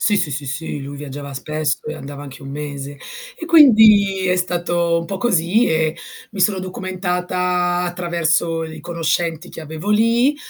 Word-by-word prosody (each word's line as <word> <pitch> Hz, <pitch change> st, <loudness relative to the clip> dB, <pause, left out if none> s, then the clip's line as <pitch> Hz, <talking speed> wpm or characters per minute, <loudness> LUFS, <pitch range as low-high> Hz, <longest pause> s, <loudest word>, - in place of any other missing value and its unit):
Sì, 210 Hz, -, +2 dB
sì, 175 Hz, -5 st, -1 dB
sì, 145 Hz, +2 st, -4 dB
sì, 145 Hz, +2 st, -4 dB
lui 140 Hz, +1 st, -7 dB
viaggiava 140 Hz, 0 st, -7 dB
spesso 150 Hz, +2 st, -2 dB
e 150 Hz, -, -4 dB
andava 140 Hz, +1 st, -8 dB
anche 140 Hz, 0 st, -10 dB
1 135 Hz, -, -8 dB
mese, 140 Hz, -1 st, -6 dB, 0.4 s
e 330 Hz, -, -6 dB
quindi 215 Hz, -, +6 dB
è 180 Hz, 0 st, +2 dB
stato 175 Hz, -1 st, 0 dB
un 170 Hz, -, -5 dB
po' 195 Hz, -, -4 dB
così 200 Hz, +1 st, +2 dB
e 160 Hz, 0 st, +1 dB, 0.4 s
mi 200 Hz, -, -5 dB
sono 190 Hz, +1 st, +3 dB
documentata 180 Hz, -1 st, -1 dB
attraverso 170 Hz, -2 st, 0 dB
i 160 Hz, 0 st, -8 dB
conoscenti 170 Hz, 0 st, -2 dB
che -, -, -9 dB
avevo 160 Hz, +6 st, -5 dB
lì, 230 Hz, +6 st, +3 dB
175 Hz, 165 wpm, -19 LUFS, 155-185 Hz, 0.4 s, quindi